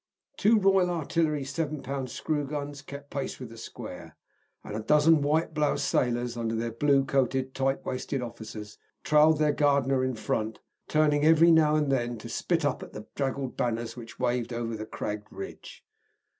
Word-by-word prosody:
Two 220 +2 +4
Royal 195 -3 +4
Artillery 160 -3 0
7 145 +1 -3
lb. 135 0 -3
screw 150 +4 -2
guns 145 -1 -5
kept 140 0 -10
pace 140 -2 -4
with 125 -3 -7
the 115 - -12
square, - - -9 0.5
and 105 - -6
a - - -2
dozen 150 +6 +4
white 155 +3 +1
bloused 150 -2 +1
sailors, 120 -1 0
under 115 -1 -2
their 115 +1 -2
blue 140 +3 +3
coated, 130 -1 0
tight 135 0 -1
waisted 130 +2 -3
officers, 110 -3 -8 0.2
trailed 150 +1 +5
their 150 -1 +2
Gardner 140 -3 +2
in 130 -1 -1
front, 110 0 -2 0.3
turning 150 -1 +3
every 165 +2 +6
now 155 -2 +5
and 150 -2 +1
then 120 -3 0
to 115 +2 -9
spit 165 +3 0
up 145 - 0
at - - -10
the 105 0 -8
draggled 135 -1 -2
banners 115 -1 -2
which 115 -2 -10
waved 125 -1 -1
over 115 -1 -3
the 110 0 -6
cragged 105 -1 -5
ridge. - - -9
135 Hz, 175 wpm, -28 LUFS, 120-150 Hz, 0.5 s, every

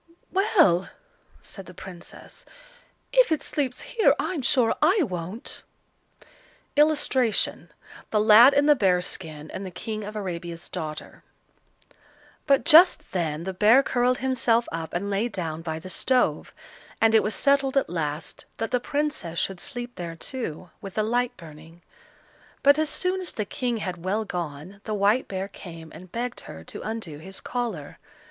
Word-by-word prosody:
"Well!" 375 - +3 0.5
said 195 -2 -10
the 180 - -12
Princess, 180 -1 -10 0.7
"if - - +5
it 315 - +1
sleeps 265 -4 -2
here, 450 - +2
I'm 345 -6 -2
sure 245 -3 +3
I 355 +5 +4
won't." 185 - -5 1.1
[Illustration: 290 -6 +2 0.4
The 215 - +1
Lad 220 +5 +8
in 285 +1 +4
the 300 - +7
Bear's 180 -6 +2
skin, 155 -3 -6
and 190 - -6
the 190 - -5
King 215 +4 -5
of 210 +1 -7
Arabia's 175 -4 -5
daughter.] 155 -1 -6 1.3
But 275 -2 +3
just 335 +3 +6
then 165 -4 -2
the 190 +1 -4
bear 220 +8 +5
curled 250 0 +1
himself 240 -2 +1
up 160 -1 -5
and 200 +3 -2
lay 205 +5 0
down 165 -6 -4
by 160 -1 -4
the 165 +3 -9
stove; 250 +7 +1 0.5
and 225 0 +4
it 220 - +6
was 210 - -1
settled 275 -1 +2
at 275 - +2
last 155 -2 -4
that 225 - -3
the 250 - +2
Princess 285 - -2
should 190 +1 -1
sleep 245 +3 -6
there 170 -2 -5
too, 175 - -6
with 195 0 -9
a 215 - +2
light 245 +2 0
burning. 160 +1 -14 0.8
But 285 +2 +6
as 310 -1 +1
soon 370 +2 0
as 360 - -4
the 210 - -3
King 240 +3 -2
had 180 -5 -5
well 210 +4 -1
gone, 175 +1 -6
the 215 - -2
white 205 +5 +2
bear 190 0 -4
came 165 -5 -11
and 185 0 -12
begged 245 +1 -4
her 80 +1 -10
to - - -9
undo 215 -10 -5
his 190 +4 -8
collar. 225 - -4
210 Hz, 160 wpm, -25 LUFS, 175-255 Hz, 1.3 s, Lad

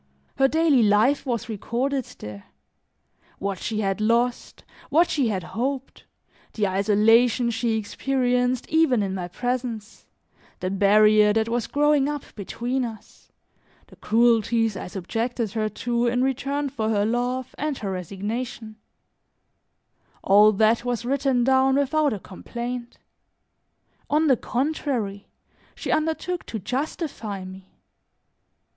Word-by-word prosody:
Her 270 - +5
daily 310 -3 +3
life 220 +7 +3
was 235 -3 -2
recorded 245 +5 -2
there; 105 -1 -9 0.9
what 195 -1 -3
she 215 -1 -2
had 195 +1 -1
lost, 235 +3 0 0.3
what 335 +3 +4
she 275 -5 +1
had 190 -5 -2
hoped, 260 +9 -4 0.5
the 210 -2 0
isolation 220 +5 +3
she 230 0 0
experienced 250 +2 0
even 305 -9 +3
in 190 -1 -2
my 180 -2 -4
presence, 240 +1 -4 0.5
the 185 - -2
barrier 210 +1 +5
that 220 0 +1
was 235 0 -1
growing 295 -1 +2
up 295 -2 -4
between 240 +5 -3
us, 225 -3 -9 0.5
the - - -18
cruelties 225 -1 +2
I - - -6
subjected 225 +5 -3
her 215 0 -1
to 235 +3 -1
in 245 +1 +1
return 275 +2 -1
for 220 -5 -2
her 205 -2 +1
love 245 +3 -2
and 295 -2 -2
her 200 -2 -4
resignation 215 +5 -5 1.5
all 210 +2 +6
that 220 +3 +3
was 245 -1 -2
written 270 -1 +1
down 265 +1 +3
without 285 +1 +2
a 210 - -3
complaint; 240 +6 -7 1.1
on 305 +2 +2
the 270 -4 +5
contrary, 245 -8 -2 0.5
she - - -4
undertook 320 +3 -1
to 225 - -4
justify 230 - -4
me. 190 0 -12
235 Hz, 125 wpm, -24 LUFS, 210-265 Hz, 1.5 s, all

